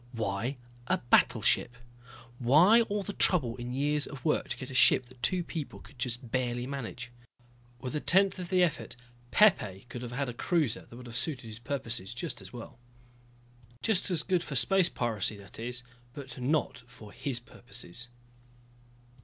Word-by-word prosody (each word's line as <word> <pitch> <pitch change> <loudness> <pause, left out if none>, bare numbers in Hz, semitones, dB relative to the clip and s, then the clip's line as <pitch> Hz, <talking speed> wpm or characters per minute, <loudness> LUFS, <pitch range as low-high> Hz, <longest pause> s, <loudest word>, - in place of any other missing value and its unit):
Why 115 +4 -2 0.3
a - - +2
battleship? 120 0 +3 0.6
Why 160 - +6
all 205 -3 -1
the 205 - -5
trouble 135 -13 +3
and 120 +1 -4
years 145 +2 +1
of 135 -3 -9
work 155 - +1
to - - -1
get 130 -1 -7
a - - -7
ship 130 0 +6
that 125 0 -18
two 180 +5 +2
people 160 -4 -6
could 140 - -17
just 120 -1 -3
barely 125 -1 0
manage? 125 -2 -6 0.7
With 125 +3 -5
a - - +1
tenth 190 +4 +3
of 180 -1 -5
the 185 -1 +4
effort 165 -7 -1 0.3
Pepe 105 - +4
could 120 - -6
have 120 -1 -6
had 135 +3 -1
a 125 - -4
cruiser 150 -1 0
that 120 - -12
would 125 - -10
have 120 -1 -9
suited 125 0 -1
his 110 0 -7
purposes 120 -5 -4
just 150 -3 -3
as 95 0 -10
well. 120 0 -10 1.0
Just 205 -3 +2
as 170 -5 0
good 185 -3 +1
for 150 - -6
space 185 +7 +4
piracy, 110 -3 -2
that 100 +1 -13
is 120 +2 -3 0.3
but 130 -3 -8
not 140 0 0
for 110 -4 -13
his 130 -4 -3
purposes. 120 -2 -5
125 Hz, 175 wpm, -30 LUFS, 120-155 Hz, 1.0 s, Why